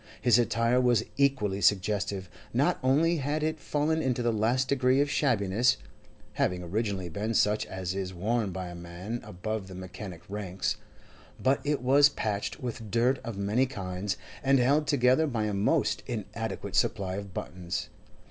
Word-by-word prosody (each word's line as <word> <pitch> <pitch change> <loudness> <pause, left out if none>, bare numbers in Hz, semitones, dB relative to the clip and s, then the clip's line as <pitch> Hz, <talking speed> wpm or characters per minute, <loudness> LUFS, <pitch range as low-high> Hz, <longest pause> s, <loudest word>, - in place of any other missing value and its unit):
His 120 -2 +5
attire 115 +1 +2
was 120 -3 +3
equally 130 -9 +1
suggestive; 100 -1 +1 0.3
not - - +2
only 155 +6 +3
had 150 +2 -1
it 155 0 -1
fallen 155 +2 0
into 125 -4 0
the 120 -1 +2
last 120 +5 +1
degree 130 -1 +3
of 145 0 +2
shabbiness 120 -3 +2 0.6
(having 90 0 0
originally 100 0 -2
been 105 +7 -3
such 105 +1 +2
as 95 -1 -4
is 95 -1 -3
worn 105 +4 0
by 90 0 -5
a - - -8
man 85 +7 -6
above 105 +2 -4
the 95 - -9
mechanic 95 -1 -8
ranks), 95 -2 -2 0.6
but 130 +1 +2
it 145 -3 -1
was 140 +3 +6
patched 105 -7 -3
with 115 -3 -5
dirt 120 +4 +2
of 115 -3 -6
many 105 +7 +1
kinds, 95 -3 -3 0.2
and 135 +3 +4
held 140 +4 +3
together 140 +2 +4
by 115 -6 -1
a 105 -1 -1
most 100 +1 +1
inadequate - - -4
supply 95 -1 +1
of 100 -1 -6
buttons. 90 -1 -4
110 Hz, 160 wpm, -29 LUFS, 95-130 Hz, 0.6 s, was